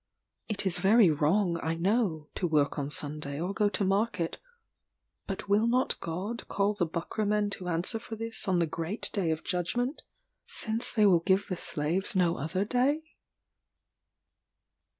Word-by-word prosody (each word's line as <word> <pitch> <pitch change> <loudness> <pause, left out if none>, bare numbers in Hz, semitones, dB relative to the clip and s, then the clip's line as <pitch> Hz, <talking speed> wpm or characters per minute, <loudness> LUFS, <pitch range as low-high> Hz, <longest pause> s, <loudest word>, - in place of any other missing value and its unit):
It 205 -2 -2
is 180 -2 +4
very 195 0 +5
wrong, 170 +4 +1
I 160 +1 -1
know, 175 -4 0
to 180 - -1
work 150 -2 +1
on 140 0 -3
Sunday 145 -1 0
or 180 +4 -2
go 210 0 +2
to 200 0 -1
market; 195 -3 0 0.9
but 195 0 -5
will 210 +3 +3
not 250 +2 +1
God 190 +8 -5
call 200 +1 +1
the 180 -5 -1
Buckra 170 +6 -3
men 210 0 +1
to 185 -2 -5
answer 175 +6 -1
for 225 0 -8
this 225 -1 -3
on 185 -2 +2
the 170 - +2
great 165 +6 -3
day 190 -6 0
of 160 0 -2
judgment 240 - -1 0.4
since 225 +1 0
they 215 -3 +3
will 180 -4 +5
give 190 +3 +2
the 185 - -1
slaves 175 +6 0
no 175 -2 +2
other 165 +7 -2
day? 265 +7 +1
190 Hz, 165 wpm, -29 LUFS, 165-215 Hz, 0.9 s, very